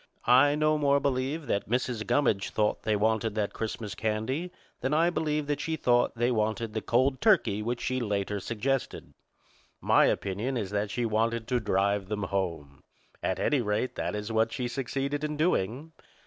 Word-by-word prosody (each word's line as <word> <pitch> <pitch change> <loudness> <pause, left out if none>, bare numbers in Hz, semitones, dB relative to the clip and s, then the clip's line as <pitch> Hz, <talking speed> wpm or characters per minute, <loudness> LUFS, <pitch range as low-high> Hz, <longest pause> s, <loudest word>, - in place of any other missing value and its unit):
I 135 +4 +5
no 155 0 +2
more 140 -1 +3
believe 140 +3 -1
that 100 -5 -2
Mrs. 120 -2 -1
Gummidge 120 -6 +2
thought 105 -1 0
they 110 - 0
wanted 110 0 +1
that 105 -2 -1
Christmas 110 -2 -4
candy 110 +10 -2 0.3
than 135 +4 0
I 170 +2 +3
believe 150 -3 -1
that 145 0 -2
she 160 - -1
thought 120 -5 +2
they 120 +2 +1
wanted 110 0 -1
the 110 - -2
cold 130 +4 +1
turkey 185 - +3
which 120 +2 -2
she 130 0 -1
later 105 -3 -1
suggested. 125 +6 -3 0.7
My - - +4
opinion 105 +7 -1
is 100 -4 -3
that 105 0 -1
she 120 +3 -1
wanted 115 +1 0
to 125 -1 +2
drive 100 -2 0
them 105 0 -3
home. 85 -8 -3 0.4
At - - -1
any 145 -4 +1
rate, 105 +3 -1
that - - -3
is 105 +2 -4
what 110 0 +2
she 125 -1 -2
succeeded 135 +3 -3
in 150 0 -2
doing. 150 - 0
115 Hz, 175 wpm, -28 LUFS, 105-140 Hz, 0.7 s, I